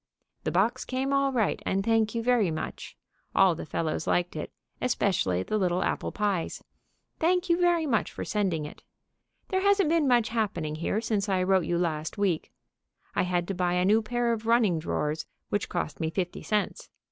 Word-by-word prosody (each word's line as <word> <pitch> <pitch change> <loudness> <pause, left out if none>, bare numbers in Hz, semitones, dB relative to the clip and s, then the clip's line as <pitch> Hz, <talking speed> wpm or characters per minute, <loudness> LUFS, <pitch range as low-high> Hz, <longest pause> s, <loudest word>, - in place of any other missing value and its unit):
The - - 0
box 225 +8 +1
came 265 +2 -2
all 275 0 +2
right, 230 -6 0
and 195 +1 0
thank 225 -1 +2
you 230 - -1
very 240 -6 +3
much. 160 0 -5 0.4
All 190 -2 +6
the 165 - -7
fellows 160 0 -2
liked 175 -1 +1
it, 150 - -5 0.3
especially 185 - +1
the 215 - -1
little 180 -1 +1
apple - - -1
pies. 200 -5 -1 0.6
Thank 360 +3 +2
you 340 - +3
very 345 -2 +3
much 235 -7 0
for - - -6
sending 185 -8 0
it. 150 - -10 0.7
There 375 0 +1
hasn't 400 -4 +3 0.2
much 245 -2 +5
been - - -10
happening 195 -9 -1
here 200 +6 -1
since 215 -3 -1
I 185 -1 +2
wrote 190 -2 +3
you 170 +2 0
last 160 -1 -2
week. 190 -6 0 0.6
I - - +1
had 180 -1 0
to - - 0
buy 180 -1 0
a 180 0 +2
new 215 +3 +4
pair 235 +2 0
of 225 0 -5
running 225 -8 +3
drawers, 155 -1 -2 0.2
which 205 - -1
cost 175 -3 -3
me 160 - 0
fifty 180 +1 -3
cents. 210 -1 -2
200 Hz, 190 wpm, -28 LUFS, 175-235 Hz, 0.7 s, All